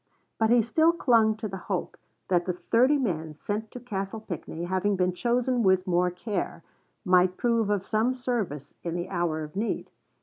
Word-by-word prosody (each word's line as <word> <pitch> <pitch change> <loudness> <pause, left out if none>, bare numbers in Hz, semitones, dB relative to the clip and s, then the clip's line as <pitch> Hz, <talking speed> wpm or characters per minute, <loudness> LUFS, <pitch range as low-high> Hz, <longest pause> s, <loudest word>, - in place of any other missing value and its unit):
But 220 0 +3
he 240 -1 +5
still 315 +9 +3
clung 230 -9 +3
to 220 0 -4
the 195 -1 -6
hope 185 -3 -2 0.3
that 175 -2 +2
the 180 - +1
thirty 250 +10 +3
men 160 - -2
sent 210 +7 -4
to 250 - -8
Castle 205 -3 -4
Pinckney, 170 -4 -6
having 190 +3 0
been 180 -1 +1
chosen 245 +4 +1
with 190 -3 +3
more 180 -1 +2
care, 180 -2 -4 0.4
might 180 0 +4
prove 230 -3 +1
of 200 -2 0
some 230 +4 +1
service 215 - -3
in 170 -1 -3
the 175 0 -3
hour 170 -4 -1
of 150 +2 -9
need. 220 +3 -2
200 Hz, 180 wpm, -27 LUFS, 180-230 Hz, 0.4 s, he